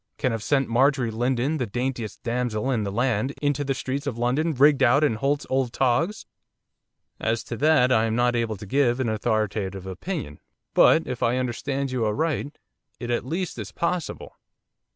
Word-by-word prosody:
can 130 - 0
have 115 -1 -3
sent 135 +2 +1
Marjorie 130 0 +2
Lindon, 125 +6 0
the 125 -5 -2
daintiest 120 0 -4
damsel 120 0 -1
in 120 -4 +1
the 100 - -3
land! 120 +3 0
into 145 -1 0
the 135 -1 -1
streets 135 +2 -3
of 125 -5 -3
London 130 +8 +1
rigged 140 +1 +5
out 130 +4 +5
in 145 - +3
Holt's 140 +6 -1
old 130 -2 0
togs!' 165 - +1 0.9
'As 110 +1 -1
to 120 - -5
that, 145 -3 +4
I 110 -2 +4
am 110 0 -1
not 120 0 +2
able 115 -3 -1
to 105 - -9
give 125 +2 +2
an 125 -3 0
authoritative 105 -4 -1
opinion, 95 - -5 0.3
but, - - +5
if - - -5
I 120 +2 +2
understand 135 +2 -2
you 125 -3 -1
aright, 145 +5 -1 0.4
it 120 0 -4
at 120 +1 -1
least 175 +5 -3
is - - -6
possible. 170 -1 -3
125 Hz, 180 wpm, -25 LUFS, 115-140 Hz, 0.9 s, rigged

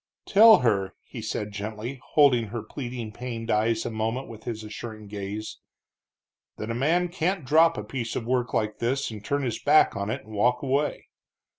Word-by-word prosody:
"Tell 220 +2 +8
her," 100 -5 +1 0.3
said 105 - -3
he - - -14
gently, 110 +5 -5
holding 135 -6 +5
her 115 +2 -5
pleading, 120 -5 -6
pained 115 -1 -5
eyes 110 +1 +1
a 120 - -2
moment 115 +4 -2
with 110 -2 -11
his 110 -2 -4
assuring 110 +1 -8
gaze, 105 +1 -6 1.0
"that 110 +2 -4
a - - -1
man 160 +9 +2
can't 175 -1 -1
drop 160 +4 +4
a 105 - -3
piece 115 +1 -4
of 115 - -3
work 125 0 0
like 105 -1 -1
this 130 +2 -1
and 105 -2 -8
turn 140 +5 -1
his 120 -4 -2
back 150 -4 +5
on 100 +1 -3
it 110 - -4
and 110 - -12
walk 125 +5 +2
away. 140 +2 -1
115 Hz, 185 wpm, -26 LUFS, 110-135 Hz, 1.0 s, Tell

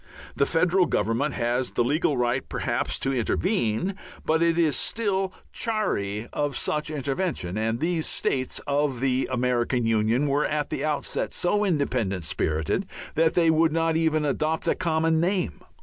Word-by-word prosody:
The 140 - +2
federal 180 +2 +3
government 115 +8 0
has 120 +2 0
the 120 - 0
legal 145 +2 +1
right 125 +2 0
perhaps - - -1
to 135 - -1
intervene, 130 - 0 0.3
but 160 +1 +2
it 170 0 +3
is 160 -3 +3
still 195 -4 -1 0.2
chary 115 - -1
of 145 -3 -1
such 150 0 -1
intervention. 140 - -2
And 115 +2 -1
these 165 0 0
states 130 -1 -1
of 145 -3 0
the 130 0 +1
American 125 -1 +1
Union 115 +4 +2
were 145 +1 +1
at 150 -1 -2
the - - -2
outset 150 -1 -1
so 205 +4 +1
independent 125 - 0
spirited 80 - -1 0.3
that 160 +1 +2
they 165 -2 +4
would 160 0 +3
not 165 0 +1
even 160 -2 +2
adopt 155 +3 -1
a - - +4
common 160 -2 +1
name. 180 +2 0
150 Hz, 155 wpm, -25 LUFS, 120-165 Hz, 0.3 s, they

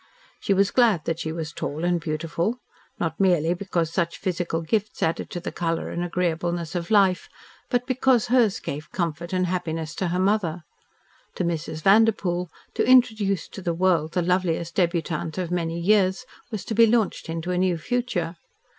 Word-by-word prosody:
She - - -2
was 200 +1 +3
glad 225 -10 +3
that 165 0 -2
she 160 - -3
was 160 -1 -5
tall 155 +2 -3
and 175 -1 +1
beautiful, 165 +7 -2 0.4
not 160 -2 -2
merely 175 -4 +3
because 170 -3 -2
such 170 -2 -1
physical 175 -3 -2
gifts 205 +5 -1
added 160 - -1
to 175 - -4
the 175 - -5
colour 165 -1 -2
and 175 - -2
agreeableness 175 -1 -1
of 175 -2 -3
life, 195 -4 +3 0.4
but 245 -1 +1
because 255 -2 +2
hers 235 -5 +3
gave 150 +3 -6
comfort 170 -1 -3
and 185 -1 +1
happiness 165 -3 -3
to 185 - 0
her 175 +1 -1
mother. 185 -4 +1 0.7
To - - -1
Mrs. 160 -2 -3
Vanderpoel, 195 -4 +3 0.2
to - - +1
introduce 220 -7 +4
to 195 - -9
the 170 -2 -1
world 170 -3 +2
the 180 - +1
loveliest 170 -2 0
debutante 170 -3 -1
of 180 -2 -3
many 170 -1 -1
years 195 +4 +2 0.2
was 215 -5 -5
to - - -3
be 230 +1 +6
launched 220 -6 0
into 165 +2 -3
a 180 - 0
new 185 -2 +2
future. 180 -3 -2
175 Hz, 175 wpm, -24 LUFS, 165-200 Hz, 0.7 s, be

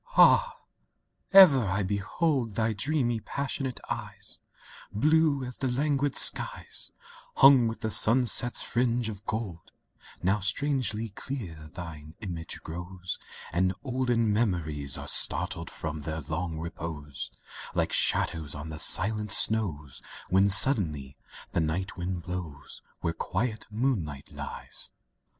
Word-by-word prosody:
III - - -21
Ah - - +6 0.8
I 195 - +4
ever 150 -10 +9
I 95 +2 -1
behold 110 - -1
Thy 110 0 0
dreamy, 120 0 -1
passionate 135 +1 -4
eyes, - - -6 0.5
Blue 150 +4 +2
as 125 0 -6
the 135 - 0
languid 140 +2 0
skies - - +3 0.4
Hung 135 -3 +7
with 115 - -5
the 110 - -2
sunset's 120 +2 +5
fringe 120 -1 0
of 105 -2 -9
gold; 100 -7 -5 0.5
Now 95 +4 +2
strangely 115 0 -1
clear 95 - -7
thine 80 -3 -9
image 85 -6 -6
grows, 90 +2 -7 0.3
And 90 +2 +1
olden 120 -4 0
memories 80 - 0
Are - - -8
startled 85 -4 +3
from 80 -1 -6
their 80 +2 -5
long 80 +3 -4
repose 80 -3 -6 0.5
Like - - 0
shadows 80 -3 +1
on 75 +2 -7
the 75 -1 -7
silent 105 +6 +4
snows 85 -13 0 0.3
When 95 +2 +4
suddenly 80 - +3 0.4
the - - 0
night 85 +5 -3
wind 90 -1 -4
blows 90 -5 -7 0.2
Where 85 - -1
quiet 110 +7 -3
moonlight 105 - -3
ties. - - -5
100 Hz, 125 wpm, -27 LUFS, 85-125 Hz, 0.8 s, ever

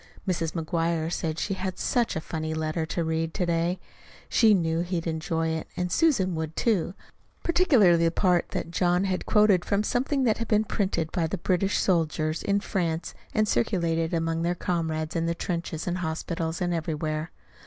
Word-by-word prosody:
Mrs. 165 -3 -1
McGuire 165 0 -1
said 160 -2 -2
she 195 - -1
had 185 -1 -4
such 240 -2 0
a 160 - -2
funny 160 0 -4
letter 160 +1 -2
to 170 - -1
read 160 0 -1
to 180 - 0
day. 170 +1 0 0.5
She 220 -3 +5
knew 165 -2 0
he'd 175 -1 -2
enjoy 165 0 -1
it, 160 0 -3
and 180 0 -1
Susan 235 - +3
would, 160 -1 -4
too, 195 -5 +1 0.5
particularly 235 - +4
the - - +4
part 180 -1 +2
that 165 - -4
John 180 +1 +2
had 185 -2 -2
quoted 210 -4 +4
from 200 +1 +1
something 265 +5 0
that 225 -3 +2
had 230 - -3
been 215 -1 +3
printed 190 -6 -1
by 170 -4 0
the 195 - -3
British 185 +3 +1
soldiers 160 -3 +1
in 200 0 +1
France 170 -5 -2 0.2
and 215 -1 +3
circulated 165 - +1
among 165 -1 0
their 175 +1 0
comrades 160 -2 -2
in 165 0 0
the 170 - 0
trenches 170 -2 -3
and 180 0 -2
hospitals, 165 0 -3
and 175 -1 0
everywhere. 155 -1 -2
170 Hz, 180 wpm, -27 LUFS, 160-190 Hz, 0.5 s, She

